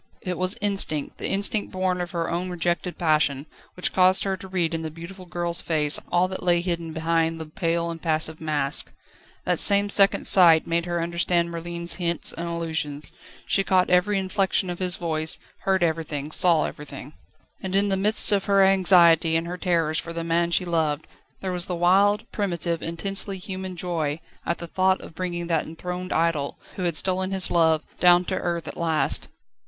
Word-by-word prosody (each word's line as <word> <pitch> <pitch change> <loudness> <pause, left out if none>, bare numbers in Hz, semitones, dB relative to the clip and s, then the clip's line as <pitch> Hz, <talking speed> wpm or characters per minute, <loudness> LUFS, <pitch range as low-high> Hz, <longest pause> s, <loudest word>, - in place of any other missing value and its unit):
It 180 -1 -3
was 185 +2 0
instinct, 195 -7 +1
the - - -2
instinct 200 +2 +2
born 185 -1 -1
of 175 - -4
her 170 -2 -3
own 175 +2 -3
rejected 175 0 -2
passion, 155 -4 +1 0.3
which 180 - -2
caused 185 0 +4
her 195 -1 -1
to 190 - -11
read 175 -3 -1
in 165 - -2
the 160 - -5
beautiful 175 +4 -11
girl's 170 -1 -2
face 150 -3 +1
all 175 +1 +2
that 190 - -6
lay 175 -1 +2
hidden 170 -2 -3
behind 165 0 -1
the 160 - -6
pale, 170 +2 -2
impassive 160 -1 0
mask. 150 -3 -1 0.5
That - - 0
same 200 0 +6
second 195 -1 +4
sight 170 -4 +6
made 170 +1 -1
her 175 -1 -2
understand 170 0 0
Merlin's 170 +1 -3
hints 170 -1 -1
and 170 +1 -5
allusions. 160 -3 -4 0.3
She 195 - +1
caught 185 -2 +1
every 190 +3 +2
inflection 190 -1 -1
of 175 - -7
his 180 -1 -1
voice, 160 -2 +1 0.3
heard 190 -2 +2
everything, 155 -3 -2
saw 165 -2 +3
everything. 145 0 -9 0.5
And 190 0 -4
in 200 +1 +2
the 195 - +1
midst 210 +3 +3
of 200 -2 +1
her 200 -1 +4
anxiety 175 -4 +5
and 165 +1 0
her 175 +1 -5
terrors 165 -4 0
for 170 - -7
the 165 0 -4
man 170 +1 0
she 180 +1 +1
loved, 160 -3 -1 0.4
there 190 - -3
was 180 -1 -1
the 180 - -3
wild, 200 +5 +3
primitive, 170 -4 -2
intensely 195 +4 -3
human 190 -1 -7
joy 165 -4 -2 0.3
at 170 - -1
the 170 - -7
thought 185 +2 +1
of - - -12
bringing 175 0 -4
that 165 -2 -1
enthroned 180 +3 -6
idol, 160 -4 -1 0.2
who 185 - -3
had 170 -3 0
stolen 185 0 0
his 190 -1 +2
love, 160 -2 +2 0.2
down 175 0 +5
to - - -2
earth 170 -1 -3
at - - -8
last. 165 -2 0
175 Hz, 190 wpm, -24 LUFS, 165-185 Hz, 0.5 s, same